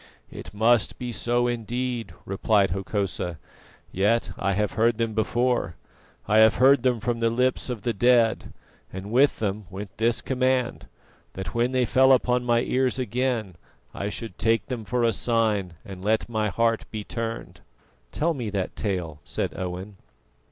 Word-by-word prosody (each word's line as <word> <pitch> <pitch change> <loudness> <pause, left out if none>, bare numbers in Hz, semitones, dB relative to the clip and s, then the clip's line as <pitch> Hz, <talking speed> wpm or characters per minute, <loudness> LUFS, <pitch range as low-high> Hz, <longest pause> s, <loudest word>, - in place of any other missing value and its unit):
"It - - -9
must 110 +1 +2
be 125 -1 -5
so, 120 +1 +1
indeed," 120 0 -3
replied 100 0 +2
Hokosa. 95 -3 -2 0.5
"Yet 105 +5 +1
I 100 +1 -1
have 105 +1 0
heard 115 0 +2
them 115 -1 -1
before; 120 -3 0 0.5
I 110 +1 +4
have 110 0 +6
heard 135 +1 +5
them 125 -2 +1
from 120 +1 -2
the 115 0 +2
lips 125 +2 0
of 115 -5 -4
the 120 - 0
dead, 120 +1 +3 0.4
and 95 +3 -7
with 135 +4 +4
them 105 -2 -3
went 95 +1 -8
this 115 +1 +2
command: 130 -1 0 0.5
that 95 - -6
when 120 +2 +1
they 130 -1 +2
fell 130 +3 +5
upon 125 -1 +2
my 120 -1 +2
ears 130 +1 0
again 120 -6 -2 0.4
I 100 - -3
should 110 -3 -7
'take 115 0 +2
them 120 -5 -5
for 125 +3 0
a 115 -1 +3
sign, 110 -7 0
and 95 -2 -9
let 110 +2 +1
my 110 -2 -1
heart 115 +3 +1
be 110 -1 -5
turned.'" 115 0 -5 0.5
"Tell 165 +2 0
me 120 -7 -4
that 100 -2 -3
tale," 90 -7 -3
said - - -3
Owen. 95 +2 -5
115 Hz, 165 wpm, -25 LUFS, 100-125 Hz, 0.5 s, have